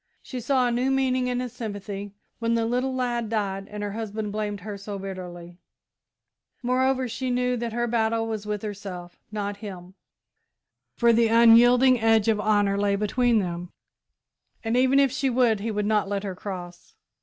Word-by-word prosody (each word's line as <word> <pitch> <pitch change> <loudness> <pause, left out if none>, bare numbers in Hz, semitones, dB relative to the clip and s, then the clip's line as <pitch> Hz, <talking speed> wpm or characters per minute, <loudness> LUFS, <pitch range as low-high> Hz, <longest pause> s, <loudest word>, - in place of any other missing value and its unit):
She 255 - -6
saw 255 +1 +2
a - - 0
new 250 +3 +1
meaning 260 -1 +1
in 250 0 -1
his 250 -2 -4
sympathy 205 -2 -6 0.2
when 230 0 +1
the 230 -1 +1
little 250 +3 -1
lad 240 -3 -1
died 195 -3 -2
and 210 0 -6
her 205 - -3
husband 215 -1 -4
blamed 205 -1 -3
her 210 +1 -6
so 200 0 -6
bitterly; 180 -2 -8 1.0
moreover, 260 +1 +1
she 255 +2 -3
knew 250 0 +1
that 235 0 -3
her 240 +1 -1
battle 225 -1 0
was 215 -2 -4
with 210 -1 -3
herself, 195 -4 -7
not 205 -1 -3
him, 190 -4 -9 1.0
for 235 -1 +4
the 230 0 +4
unyielding 240 +2 +6
edge 225 -1 +3
of 220 -2 +2
Honour 205 -2 +2
lay 200 0 +2
between 230 +4 +2
them, 175 -3 -2 0.9
and, 225 +1 0
even 260 +2 +4
if 275 -2 +4
she 265 +1 0
would, 240 -4 +2
he 220 +3 -3
would 210 -1 -1
not 210 -2 +1
let 200 -1 -2
her 195 -2 -3
cross. 180 -2 -8
220 Hz, 180 wpm, -25 LUFS, 200-245 Hz, 1.0 s, unyielding